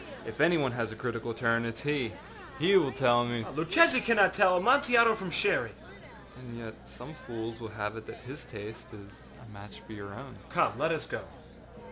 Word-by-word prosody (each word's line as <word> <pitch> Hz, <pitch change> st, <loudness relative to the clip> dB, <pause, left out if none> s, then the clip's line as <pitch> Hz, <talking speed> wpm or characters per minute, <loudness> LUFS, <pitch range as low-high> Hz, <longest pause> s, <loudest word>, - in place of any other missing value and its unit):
If 115 Hz, +4 st, -5 dB
any 170 Hz, +2 st, +5 dB
one 135 Hz, -4 st, 0 dB
has 115 Hz, -2 st, -3 dB
a -, -, -8 dB
critical 115 Hz, 0 st, -4 dB
turn, 115 Hz, 0 st, 0 dB
it 115 Hz, -1 st, -4 dB
is 115 Hz, -, -9 dB
he. 140 Hz, -6 st, -1 dB, 0.4 s
He 180 Hz, +6 st, +3 dB
will 145 Hz, -8 st, +4 dB
tell 120 Hz, -3 st, +3 dB
meââ 120 Hz, -2 st, -3 dB
âLuchesi 255 Hz, -, +4 dB
cannot 205 Hz, -5 st, +4 dB
tell 190 Hz, -2 st, +4 dB
Amontillado 240 Hz, 0 st, +5 dB
from 190 Hz, -4 st, -5 dB
Sherry.â 165 Hz, -, 0 dB, 0.7 s
âAnd 120 Hz, -2 st, -10 dB
yet 115 Hz, -1 st, -8 dB, 0.2 s
some 65 Hz, -, -11 dB
fools 115 Hz, -1 st, -7 dB
will 110 Hz, -, -7 dB
have 105 Hz, +1 st, -3 dB
it 110 Hz, -, -10 dB
that -, -, -10 dB
his 130 Hz, +4 st, -10 dB
taste 110 Hz, 0 st, -10 dB
is 100 Hz, -1 st, -13 dB, 0.4 s
a 105 Hz, -, -14 dB
match 100 Hz, 0 st, -12 dB
for 110 Hz, -, -11 dB
your 100 Hz, -1 st, -9 dB
own.â -, -, -12 dB
âCome, -, -, +1 dB
let -, -, +1 dB
us -, -, -2 dB
go. -, -, -5 dB
120 Hz, 200 wpm, -29 LUFS, 110-175 Hz, 0.7 s, any